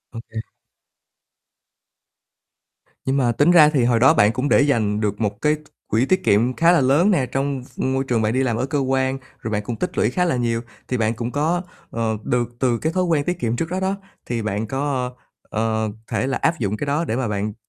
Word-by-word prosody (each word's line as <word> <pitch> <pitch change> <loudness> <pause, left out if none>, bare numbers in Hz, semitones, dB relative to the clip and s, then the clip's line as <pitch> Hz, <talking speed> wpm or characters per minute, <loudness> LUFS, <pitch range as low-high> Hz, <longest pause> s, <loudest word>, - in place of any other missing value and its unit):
Ô - - -4
kê. 115 -1 -6 2.7
Nhưng 135 +1 +1
mà 125 -3 +2
tính 145 +8 +3
ra 155 -4 +7
thì 140 -5 +1
hồi 120 -1 +3
đó 130 +6 +6
bạn 105 -9 +4
cũng 130 +4 -1
để - - +5
dành 110 -8 +1
được 105 0 -2
một 105 -1 -2
cái 150 0 +3
t - - -13 0.3
quỹ 115 +4 +2
tiết 185 +6 +1
kiệm 115 +5 +3
khá 170 +1 +4
là 175 - +4
lớn 145 +10 +4
nè 145 -9 +2
trong 135 +1 -2
v - - -5
môi 135 0 0
trường 120 -4 0
bạn 110 +1 +1
đi 130 +1 +1
làm 120 -4 0
ở 130 - 0
cơ 145 +1 -1
quan, 130 0 0 0.2
rồi 110 - -5
bạn 105 -1 -1
cũng 115 +3 -4
tích - - -4
lũy 110 - +3
khá 180 +6 +1
là 170 - +1
nhiều. 115 -2 0 0.3
Thì 125 - -1
bạn 110 -1 +1
cũng 120 +1 -4
có, 160 +6 0 0.3
ờ, 110 -1 -1
được 120 -1 0
từ 125 -3 +2
cái 160 +1 -1
thói 185 0 +1
quen 165 -5 +1
tiết 180 +3 -2
kiệm 115 -5 -1
trước 160 +6 -2
đó 185 - -2
đó, 190 +1 0 0.3
thì 120 -1 -2
bạn 105 +1 -2
có, 135 -1 -2 0.4
ờ, 110 0 -1 0.2
thể 130 - 0
là 135 - 0
áp 165 - +1
dụng 105 -1 -1
cái 145 - -4
đó 150 +4 0
để 115 - -2
mà 130 -1 -1
bạn 105 0 -2
130 Hz, 240 wpm, -21 LUFS, 115-145 Hz, 2.7 s, ra